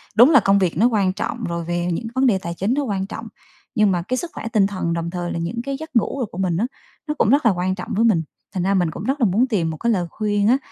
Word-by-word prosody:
đúng 240 +6 +8
là 275 - +8
công 200 0 +3
việc 175 -4 0
nó 230 +5 +5
quan 200 -5 +1
trọng - - -4
rồi 170 -1 -3
về 175 0 -1
những 225 +7 -3
vấn 265 +1 +3
đề 200 -5 +3
tài 170 -2 -5
chính 195 +8 -1
nó 285 +1 0
quan 195 -5 -2
trọng, 225 +2 -7 0.5
nhưng 210 -2 +4
mà 175 -1 0
cái 255 - 0
sức 340 +3 -4
khỏe 225 - -6
tinh 200 -3 +4
thần 185 -4 -2
đồng 170 0 -2
thời 175 -1 -4
là 170 - -3
những 225 +8 -3
cái 275 0 -3
giấc 315 -4 -9
ngủ 255 +4 +1
đồ - - +1
của 185 - -12
mình 180 -3 0
á, 230 +5 +1 0.4
nó 300 - 0
cũng - - +3
rất 280 0 +3
là 225 - +6
quan 185 +1 -1
trọng 225 - -7
với 225 +3 +3
mình, 175 -8 +3 0.3
thành 180 -2 -1
ra 195 +1 +2
mình 175 -4 +1
cũng - - -7
rất 275 +2 -1
là - - +5
muốn 225 +8 +2
tìm 180 -9 0
một 155 - -5
cái 235 0 0
lời 180 -5 0
khuyên 205 -1 0
á, 255 +3 +5
200 Hz, 315 wpm, -21 LUFS, 175-235 Hz, 0.5 s, đúng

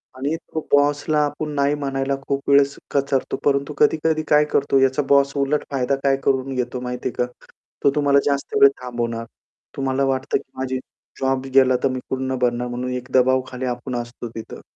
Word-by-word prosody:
आणि 140 +4 -2
तो 160 -1 -6
बॉसला 145 +1 +3
आपण 150 +1 -4
नाही 140 0 +2
म्हणायला 135 -1 -1
खूप 140 0 -2
वेळेस 140 0 +4 0.2
कचरतो. 140 -1 0
परंतु 140 +1 +1
कधी-कधी 155 0 +2
काय 150 0 +5
करतो, 135 -1 +3
याचा 135 +1 +3
बॉस 140 0 +4
उलट 140 +2 +1
फायदा 135 0 +1
काय 135 -1 +3
करून 135 0 +1
घेतो 125 0 -2
माहिती 125 0 -3
आहे 125 - -1
का? 125 - -13 0.5
तो 140 - +5
तुम्हाला 140 -1 +4
जास्त 140 -1 -1
वेळ 140 - +10
थांबवणार. 120 -2 -3 0.5
तुम्हाला 135 0 0
वाटतं 130 0 0
की 135 - -13
माझी 130 0 -2 0.4
जॉब 135 0 0
गेला 130 -1 +5
तर 135 - +3
मी 130 0 -3
कुठून 130 0 -2
ना 130 - -1
भरणार 120 0 +1
म्हणून 125 +1 -4
एक 125 0 -5
दबावाखाली 130 0 +2
आपण 125 +1 -4
असतो 120 0 -5
तिथं. 110 - -8
135 Hz, 185 wpm, -22 LUFS, 125-140 Hz, 0.5 s, वेळ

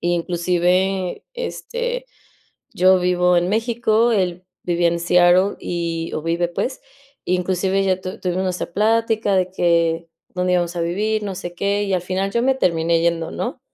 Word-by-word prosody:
inclusive, 180 - 0
este, - - -4 0.7
yo 185 +1 +5
vivo 180 0 +2
en 175 +1 +2
México, 230 +1 +1
él 185 -3 -1 0.2
vivía 175 -1 +2
en 170 0 -1
Seattle 180 +3 +4
y 170 -1 -3
o 155 - -3
vive 170 +1 0
pues, 250 +9 -3 0.4
inclusive 185 +2 0
ya 185 -1 +1
tu 185 +3 -7
tuvimos 185 +1 -1
nuestra 180 -2 -3
plática 220 0 +1
de 185 0 +1
que 170 -2 +1 0.3
dónde 180 0 0
íbamos 175 0 0
a - - -1
vivir, 210 +6 -1
no 200 -2 -4
sé 175 -1 -7
qué, 200 +3 0
y 195 - -2
al 180 - 0
final 185 +2 -2
yo 235 - +1
me 265 +1 +3
terminé 165 -7 +1
yendo, 170 -1 0
¿no? - - -4
180 Hz, 160 wpm, -20 LUFS, 175-200 Hz, 0.7 s, yo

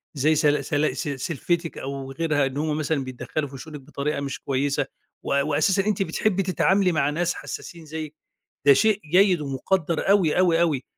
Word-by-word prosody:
زي 150 +3 +3
سل 145 -1 +2
سل 150 0 0
س - - -3
سلفتِك 165 +4 -2
أو 135 0 -5
غيرها، 145 0 +1
إن 135 +1 -4
هُم 150 0 -1
مثلًا 155 -2 -1
بيدخّلوا 130 +3 -4
في 135 - -9
شؤونِك 150 +2 -9
بطريقة 145 +1 -3
مش 140 -1 -4
كويسة، 140 +1 0 0.4
وأ 140 - +1
وأساسًا 155 +7 +1
أنتِ 210 -2 0
بتحبّي 195 +3 0
تتعاملي 190 +1 +2
مع 150 -3 +1
ناس 170 +3 0
حساسين 170 -2 -8
زيِّك، 155 0 -6 0.5
ده 140 - +9
شيء 215 +7 +3
جيد 185 -2 +5
ومُقدَّر 155 +6 -1
أوي، 185 -6 +4
أوي، 170 -2 +4
أوي، 150 -7 +1
155 Hz, 175 wpm, -24 LUFS, 140-175 Hz, 0.5 s, ده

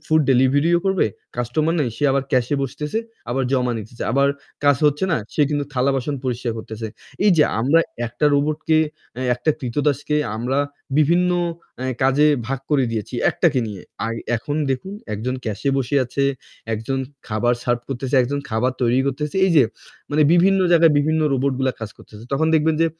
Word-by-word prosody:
Food 155 0 +4
ডেলিভারিও 140 +7 +4
করবে। 190 -8 +2 0.3
Customer 150 +8 0
নেই, 130 - +1
সে 145 - -2
আবার 135 -1 +1
ক্যাশ 125 -2 +3
এ - - 0
বসতেছে। 150 - -3 0.3
আবার 135 +2 0
জমা 125 -2 +1
নিতেছে। 110 +3 -8
আবার 140 +1 +3 0.4
কাজ 145 -2 +5
হচ্ছে 150 +5 +1
না, - - +3 0.2
সে - - 0
কিন্তু 145 -1 0
থালা 130 +1 +2
বাসন 135 +3 -2
পরিষ্কার 120 -2 -2
করতেছে। 110 0 -6 0.4
এই 205 - +6
যে 150 - +7 0.2
আমরা 145 +7 +4 0.3
একটা 120 +6 0
রোবটকে 155 +2 +1 0.4
অ্যা 130 +2 -4
একটা 125 +6 0
কৃতদাসকে 145 +3 0 0.2
আমরা 125 +4 -1 0.4
বিভিন্ন 175 +4 +3 0.5
আ - - -2 0.2
কাজে 135 +3 +4 0.2
ভাগ 135 +1 -3
করে 135 -3 +3
দিয়েছি। 110 +2 -4 0.2
একটাকে 150 -6 +1
নিয়ে। 100 -4 -7 0.5
এখন 145 +6 -4
দেখুন, 160 +10 -3 0.2
একজন 125 +5 -3
ক্যাশ 110 -1 -4
এ - - +4
বসে 135 +2 -1
আছে, 140 +3 -1 0.5
একজন 115 +5 -3 0.3
খাবার 120 +3 +1
সার্ভ 120 -1 +1
করতেছে, 135 0 -3
একজন 140 +3 -2
খাবার 120 +4 +1
তৈরি 120 +1 +3
করতেছে। 150 +5 -2
এই - - +1
যে 140 - +8 0.5
মানে 150 +1 +3
বিভিন্ন 190 +3 +4
জায়গায় 165 -2 +6
বিভিন্ন 155 +2 +1
রোবট 135 +1 +1
গুলা 130 -1 +1
কাজ 110 -2 -5
করতেছে। 105 +1 -13
তখন 150 +4 +2
দেখবেন 160 +1 +3
যে 165 - +4
135 Hz, 175 wpm, -21 LUFS, 120-150 Hz, 0.5 s, যে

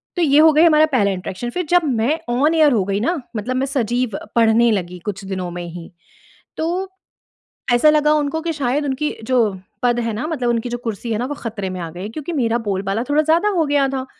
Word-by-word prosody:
तो 355 - -1
ये 290 -2 +4
हो 315 +1 +7
गई 310 +2 +5
हमारा 310 -2 +6
पहला 200 -5 +3
इंटरैक्शन, 190 +5 -5
फिर 360 +8 -3
जब 355 -1 +4
मैं 265 +4 0
ऑन 295 +6 +2
एयर 310 -3 +5
हो 205 -5 +2
गई 200 0 -1
ना, 325 +8 0 0.2
मतलब 250 +5 -3
मैं 265 - +1
सजीव 245 -4 -1 0.2
पढ़ने 230 0 +4
लगी 180 -3 -3
कुछ 195 -1 -5
दिनों 185 -2 -4
में 175 0 -6
ही 170 0 -9 0.7
तो, 355 +4 -2 0.9
ऐसा 305 +6 +5
लगा 300 0 +3
उनको 300 +1 0
कि 335 0 -2
शायद 285 0 -1
उनकी 285 +2 -2
जो 255 0 +2 0.4
पद 240 -1 +2
है 230 -1 -2
ना, 225 +8 -3
मतलब 255 -7 -2
उनकी 235 +1 -1
जो 240 - -3
कुर्सी 225 +1 -4
है 215 - -1
ना, 245 - -2
वो 290 - -4
खतरे 205 -5 -5
में 185 - -5
आ 165 -1 -5
गई 180 +5 -7
क्योंकि 310 +7 -6
मेरा 235 -4 +1
बोलबाला 195 +3 -1
थोड़ा 300 +1 +3
ज़्यादा 330 +6 +2
हो 330 - +3
गया 285 -1 +2
था, 265 -1 -3
245 Hz, 230 wpm, -19 LUFS, 210-300 Hz, 0.9 s, हो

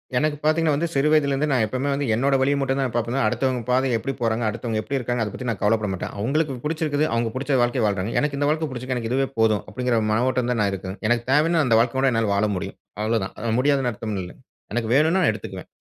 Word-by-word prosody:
எனக்கு 150 +3 +1
பார்த்தீங்கன்னா 155 0 +2
வந்து 170 +4 0
சிறு 140 +2 +2
வயதில 145 -3 +3
இருந்து 145 +2 0
நான் 125 -4 +3
எப்பவுமே 130 +6 -2
வந்து 140 0 -1
என்னோட 135 +4 +2
வழிய 140 +2 +3
மட்டும் 135 0 0
தான் 125 -3 -1
பார்ப்பேன். 120 +1 -1
அடுத்தவங்க 130 +2 0
பாதை 130 +2 +3
எப்படி 135 +4 -3
போறாங்க, 115 0 0
அடுத்தவங்க 115 0 -3
எப்படி 140 - -3
இருக்காங்க 120 -1 -1
அத 105 - -4
பத்தி 125 - -6
நான் 110 - -2
கவலைப்பட 105 0 +2
மாட்டேன். 90 - -5
அவங்களுக்கு 140 +6 0
புடிச்சுருக்குது 155 -1 0
அவங்க 115 -1 0
புடிச்ச 135 +1 0
வாழ்க்கைய 120 0 +1
வாழ்றாங்க. 100 +1 -1
எனக்கு 145 -1 -1
இந்த 145 - +1
வாழ்க்க 155 0 0
புடிச்சுருக்குது 130 0 -4
எனக்கு 115 0 -3
இதுவே 135 +1 +1
போதும் 110 -3 +3
அப்டிங்குற 120 +2 0
மனவோட்டம் 125 +2 +1
தான் 115 -3 0
நான் 100 - +1
இருக்கேன். 95 +1 -6
எனக்கு 120 +1 +1
தேவன்னா 160 +3 +3
அந்த 115 -3 +4
வாழ்க்க 120 +3 +1
கூட 135 -1 +3
என்னால 115 -3 +1
வாழ 105 +2 +2
முடியும் 90 - -6 0.2
அவ்வளோதான். 110 -2 -1
அது 110 - +1
முடியாது 135 -2 +2
அர்த்தம் 105 -1 -4
இல்ல. 90 - -8 0.4
எனக்கு 115 -2 -1
வேணுன்னா 160 +6 +4
நான் 110 - +4
எடுத்துக்குவேன். 95 -3 -8
125 Hz, 230 wpm, -23 LUFS, 110-140 Hz, 0.4 s, அந்த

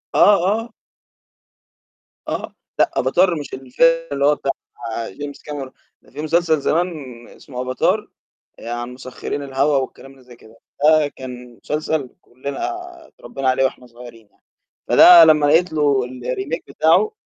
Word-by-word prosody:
آه، 205 - +6
آه. 225 +4 -1 1.6
آه، - - -4 0.3
لأ، 335 - +3
أفاتار 175 +7 +2
مش 145 - -9
الفيلم 130 +4 +1 0.3
اللي 140 0 0
هو 150 +1 +4
بتاع 140 - -2 0.6
جيمس 145 +8 -9
كاميرون، 140 -3 -7 0.4
في 150 - -7
مسلسل 160 0 +1
زمان 170 +5 +1 0.4
اسمه 125 -2 -9
أفاتار 130 0 0 0.5
عن 120 +1 -5
مسخّرين 130 +2 -6
الهَوا 140 +1 +1
والكلام 135 0 -5
اللي 135 -1 -19
زي 125 -1 -15
كده. 110 0 -19 0.3
ده 155 -1 +5
كان 125 -3 -10
مسلسل 150 -3 -2
كُلّنا 130 +3 -8 0.5
اتربّينا 135 -1 -4
عليه 130 +1 +2
وإحنا 130 -1 -4
صغيرين 120 -2 -14
يعني، - - -38 0.5
فده 175 -2 +9
لمّا 155 -2 +5
لقيت 160 +3 +3
له 140 -4 +1
الremake 130 +5 -4
بتاعه 165 - +2
140 Hz, 135 wpm, -20 LUFS, 125-155 Hz, 1.6 s, فده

